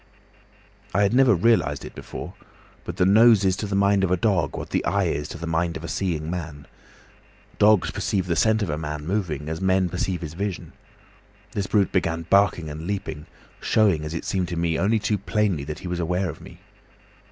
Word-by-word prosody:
"I 100 - +4
had 100 - +2
never 125 -3 +5
realised 90 -7 +2
it - - -9
before, - - -8 0.5
but - - -6
the 90 - +3
nose 110 +1 +6
is 95 -1 +3
to 105 - -3
the 100 - -2
mind 100 0 +3
of 95 - +1
a 90 - +2
dog 85 -7 0
what - - -7
the - - 0
eye - - +1
is 75 0 -1
to - - -7
the 85 - -6
mind 85 +1 -1
of 80 - -11
a - - -5
seeing 85 -5 -2
man. 80 -4 -5 0.9
Dogs 105 -2 +4
perceive 95 -3 -1
the 85 -2 -1
scent 110 +5 +2
of 90 - -2
a 75 - -3
man 75 -1 -5
moving 85 -6 -2
as 80 +2 -4
men 95 -1 +2
perceive 90 +1 -2
his 80 -2 -6
vision. 100 +1 -4 0.8
This 100 -2 -3
brute 100 -1 +2
began 85 -3 0
barking 100 -4 +3
and 75 +2 -7
leaping, 80 -7 -4 0.3
showing, 100 -8 +2
as 75 +2 -5
it 85 - -5
seemed 95 -2 -1
to 85 - -4
me, 85 -1 0
only 105 +5 +2
too 105 -1 -1
plainly 100 -6 0
that 75 +1 -5
he - - -3
was 90 0 -3
aware 90 +1 -1
of 80 - -14
me. - - -13
90 Hz, 210 wpm, -24 LUFS, 80-100 Hz, 0.9 s, nose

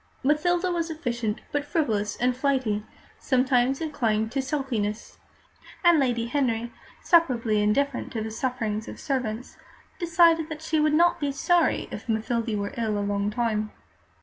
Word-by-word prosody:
Mathilde 350 +6 +2
was 335 -1 -1
efficient, 240 -9 -3
but 290 -1 0
frivolous 225 -10 -1
and 250 0 +1
flighty, 255 -6 0 0.4
sometimes 255 0 +2
inclined 225 -8 0
to 270 +1 0
sulkiness; 250 -7 -3 0.6
and 345 -3 +6
Lady 240 -4 +1
Henry, 235 -3 -1 0.3
superbly 240 -11 +3
indifferent 245 +6 0
to 225 - -2
the 220 - -5
sufferings 225 -3 -2
of - - -8
servants, 250 -4 -3 0.4
decided 330 -2 +4
that 310 0 -7
she 320 -1 0
would 300 0 +3
not 345 +1 +4
be 285 -2 -1
sorry 340 +4 +2
if - - -8
Mathilde 225 0 -1
were 200 0 -3
ill 220 -2 0
a 205 - -1
long 200 0 0
time. 215 -2 -1
250 Hz, 150 wpm, -26 LUFS, 220-300 Hz, 0.6 s, and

